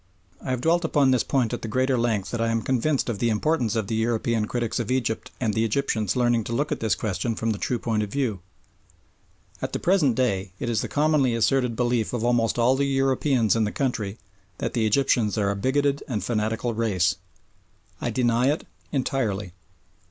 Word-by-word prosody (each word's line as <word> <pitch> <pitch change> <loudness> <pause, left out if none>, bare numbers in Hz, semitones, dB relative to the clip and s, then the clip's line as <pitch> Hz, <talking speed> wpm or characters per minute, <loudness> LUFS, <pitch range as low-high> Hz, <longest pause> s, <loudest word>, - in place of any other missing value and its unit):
I - - -5
have 130 -1 -1
dwelt 170 +3 +2
upon 145 -4 +3
this 125 -3 +3
point 130 -5 0
at - - -3
the - - -5
greater 130 +4 +1
length 115 -5 0
that 120 - -2
I 115 - +1
am 115 -1 0
convinced 130 +3 0
of 115 -5 -3
the 120 - +1
importance 120 +1 0
of 110 -2 0
the 110 - -4
European 115 -1 0
critics 120 -1 -2
of 115 - -3
Egypt 125 -3 -1
and 110 -4 0
the 110 +2 +1
Egyptians 110 -3 0
learning 120 -2 +2
to 115 - -4
look 145 +5 -1
at - - -1
this 110 -6 +1
question 105 +3 -2
from 115 +1 -1
the 105 - -3
true 125 - -1
point 110 -2 -1
of 105 - -3
view. 120 -6 -1 1.2
At - - -4
the - - -1
present 170 -10 +3
day 100 -7 0
it 120 - -2
is 110 -2 +1
the - - -3
commonly 145 -5 +2
asserted 125 +1 +1
belief 120 -1 0
of 120 -1 -1
almost 120 -2 +2
all 120 +2 +4
the 140 +1 +1
Europeans 135 -3 +2
in 115 - +2
the 105 - -1
country 115 -7 -2 0.4
that - - -3
the 115 -3 +1
Egyptians 110 -2 +2
are 100 -2 +1
a - - -2
bigoted 140 +6 +1
and 110 -7 -2
fanatical 115 +1 -1
race. 100 -4 +1 0.8
I - - -1
deny 120 0 +2
it 150 +3 0 0.3
entirely. 110 - -1
120 Hz, 205 wpm, -25 LUFS, 110-130 Hz, 1.2 s, all